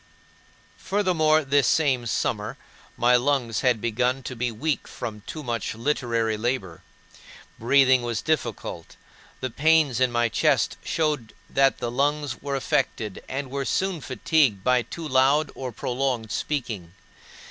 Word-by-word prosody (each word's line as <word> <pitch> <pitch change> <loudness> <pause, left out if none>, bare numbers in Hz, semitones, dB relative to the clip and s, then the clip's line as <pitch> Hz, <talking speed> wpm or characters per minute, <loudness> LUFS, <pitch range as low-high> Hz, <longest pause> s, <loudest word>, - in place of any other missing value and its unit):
4. 195 - -4
Furthermore, 155 -6 +3
this 140 0 +3
same 135 -7 +2
summer 105 - -2 0.4
my 120 +1 +4
lungs 125 -3 +1
had 125 -4 +2
begun 125 +4 0
to 125 - -6
be 120 0 -1
weak 145 +6 -2
from 110 -3 -6
too 155 - -6
much 115 -4 -3
literary 115 -3 0
labor. 105 -7 -2 0.8
Breathing 130 +1 +4
was 120 -2 -3
difficult; 115 - -3 0.5
the 130 - -3
pains 150 -3 +3
in 130 -1 +3
my 120 0 +2
chest - - +2
showed 150 -8 -1 0.2
that 135 0 +3
the 120 -1 -3
lungs 145 +3 -1
were 140 0 -3
affected 120 -6 -1
and 135 -1 -4
were 140 0 -2
soon 185 +3 -1
fatigued 130 - +1
by 125 0 +3
too 165 +6 -7
loud 135 +3 +3
or 130 -2 -5
prolonged 125 -2 -2
speaking. 110 - -3
130 Hz, 140 wpm, -25 LUFS, 115-145 Hz, 0.8 s, my